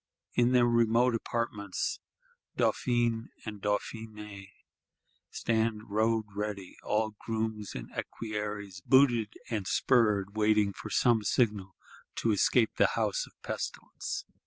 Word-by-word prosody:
In 120 0 +3
their 125 -1 +5
remote 120 +1 +3
apartments, 110 -4 -2 0.6
Dauphin 120 -2 +1 0.2
and 105 -3 -6
Dauphiness 105 -1 -4 0.8
stand 110 -2 -1
road 110 +1 +2
ready; 100 -2 -4
all 110 +1 0
grooms 110 -2 -3
and - - -5
equerries 105 -3 -5
booted 120 -5 +4 0.2
and 105 -5 -2
spurred: 105 -5 +2
waiting 105 -2 +3
for - - -8
some 120 -3 +3
signal 105 -4 +1 0.4
to 115 - +1
escape 110 +3 +3
the - - +5
house - - 0
of - - -22
pestilence. 400 -1 -4
110 Hz, 110 wpm, -30 LUFS, 105-115 Hz, 0.8 s, their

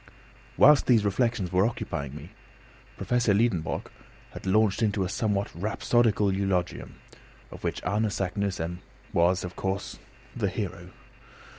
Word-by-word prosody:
Whilst 145 +1 +6
these 115 -4 +4
reflections 105 -2 0
were 95 +1 +3
occupying 70 - -3
me, 75 +4 -10 0.7
Professor 120 -4 +1
Liedenbrock 100 -7 0 0.4
had - - -9
launched 105 +1 +3
into 105 -3 +1
a 90 - -3
somewhat 100 -1 -1
rhapsodical 105 +2 +1
eulogium, 95 -2 -2 0.6
of - - -11
which - - -3
Arne 105 +4 0
Saknussemm 95 -3 -2 0.3
was, 90 +2 +3
of 90 0 -6
course, 95 0 -3 0.4
the - - 0
hero. - - -5
100 Hz, 125 wpm, -27 LUFS, 90-110 Hz, 0.7 s, Whilst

